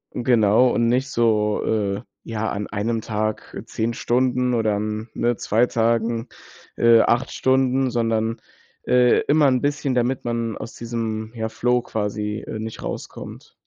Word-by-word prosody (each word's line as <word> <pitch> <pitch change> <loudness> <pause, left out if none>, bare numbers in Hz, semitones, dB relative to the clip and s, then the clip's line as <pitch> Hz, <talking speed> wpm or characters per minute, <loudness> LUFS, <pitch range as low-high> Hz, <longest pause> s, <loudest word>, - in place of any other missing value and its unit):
Genau 120 -1 +4
und 115 -1 +1
nicht 130 +2 +1
so, 105 -2 +1
äh, 100 -2 0 0.2
ja, 110 -1 -3
an 100 0 -3
einem 110 +3 -2
Tag 110 0 -3
10 115 +1 -2
Stunden 125 +1 +1
oder 110 -3 +1
an 105 +2 -3
ne 120 0 0
2 115 +4 +2
Tagen, 115 0 0 0.5
äh, 115 -1 +6
8 120 +3 +1
Stunden, 130 0 +2
sondern, 115 -1 0 0.5
äh, 125 0 +4
immer 150 0 +3
'n 130 -2 +2
bisschen, 145 -2 -1
damit 125 +1 0
man 115 -2 -2
aus - - -8
diesem, 115 -1 -4
ja, 110 -1 -3
Flow 125 +2 +1
quasi, 105 -1 -3
äh, 110 - -5
nicht 110 0 -6
rauskommt. - - -7
115 Hz, 150 wpm, -22 LUFS, 110-125 Hz, 0.5 s, äh